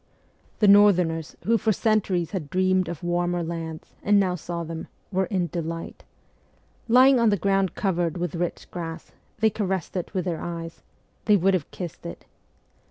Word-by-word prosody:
The 210 - +3
northerners, 180 -6 +4
who 230 +1 +2
for 220 0 +2
centuries 200 -6 +1
had 170 -8 -4
dreamed 185 +1 +2
of 170 -2 -7
warmer 175 0 0
lands, 165 -1 -6
and 205 0 +4
now 185 -2 +2
saw 170 0 -4
them, 165 0 -6 0.2
were 190 -1 +1
in 185 -4 0
delight. 165 -1 -5 0.8
Lying 255 +2 +6
on 230 -1 +4
the 205 - +2
ground 195 0 +1
covered 175 -4 0
with 175 -3 -3
rich 175 0 -3
grass, 165 -2 -6 0.3
they 220 -1 +4
caressed 190 -5 -2
it 180 - -3
with 185 - 0
their 170 -3 -2
eyes 165 -1 -6 0.4
they 210 -1 +5
would 190 +2 +3
have 175 -6 -1
kissed 175 -3 -7
it. 85 - -9
180 Hz, 165 wpm, -25 LUFS, 170-200 Hz, 0.8 s, Lying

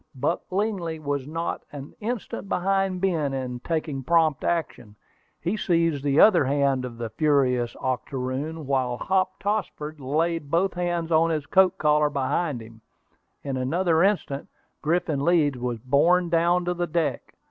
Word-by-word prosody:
Buck 145 +7 -1
Lingley 190 -5 -1
was 145 -3 -3
not 165 +2 -3
an 145 -1 -9
instant 220 -3 -4
behind 195 -1 0
Ben 160 -8 0
in 125 -2 -4
taking 155 -1 -3
prompt 160 0 +2
action. 125 -10 -2 0.4
He 180 +5 -1
seized 165 -7 +1
the 145 +1 +2
other 180 -9 +6
hand 135 -1 +1
of 120 -2 -8
the 115 -2 -5
furious 125 -2 +1
octoroon, 130 +4 -3
while 130 -3 0
Hop 185 +2 0
Tossford 175 -7 -3
laid 155 +3 -1
both 175 +4 +1
hands 175 -2 -2
on 165 +1 +4
his 155 -3 -1
coat 190 +2 +4
collar 150 0 +3
behind. 140 -1 -1 0.8
In 135 -2 -3
another 160 +5 +1
instant 180 -8 0 0.3
Griffin 155 -3 0
Leeds 150 -6 +2
was 120 -1 -2
borne 165 +9 +3
down 170 +1 +2
upon 175 0 -2
the 175 - 0
deck. 165 -1 -2
155 Hz, 145 wpm, -25 LUFS, 135-175 Hz, 0.8 s, other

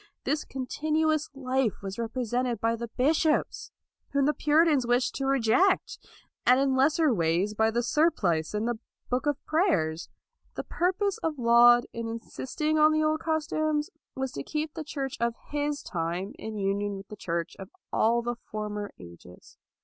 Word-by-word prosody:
This 300 0 0
continuous 310 +3 -1
life 260 -5 -1
was 195 +2 -5
represented 240 0 -1
by 230 +1 +1
the 235 +1 -5
bishops, 300 +7 +1 0.4
whom 280 -1 +3
the 300 - +3
Puritans 300 -4 +3
wished 245 +1 +2
to 270 - -2
reject, 275 - +2 0.4
and 250 +1 +5
in 270 -1 +2
lesser 290 +2 +3
ways 175 +2 +1
by 220 +1 +2
the 235 +2 0
surplice 210 - +1
and 215 +2 -1
the 240 -2 -2 0.3
book 255 +4 0
of 290 -2 +1
prayers. 290 - +1 0.5
The - - -4
purpose 375 +3 0
of 320 -2 -2
Laud 240 0 +6
in 230 0 -4
insisting 265 +7 -2
on 305 +1 +6
the 310 0 +2
old 310 0 +1
customs 310 -1 -1 0.2
was 265 -1 -2
to 140 - -5
keep 305 - -3
the 320 - -5
Church 275 -3 -4
of 235 0 0 0.2
his 290 0 -2
time 175 +3 -3
in 220 -1 -6
union 200 0 -1
with 195 -1 -11
the 210 - -7
Church 170 -3 -3
of 190 0 -8 0.2
all 235 +2 +2
the 240 0 -3
former 210 -1 -4
ages. 85 +1 -14
250 Hz, 165 wpm, -28 LUFS, 215-300 Hz, 0.5 s, Laud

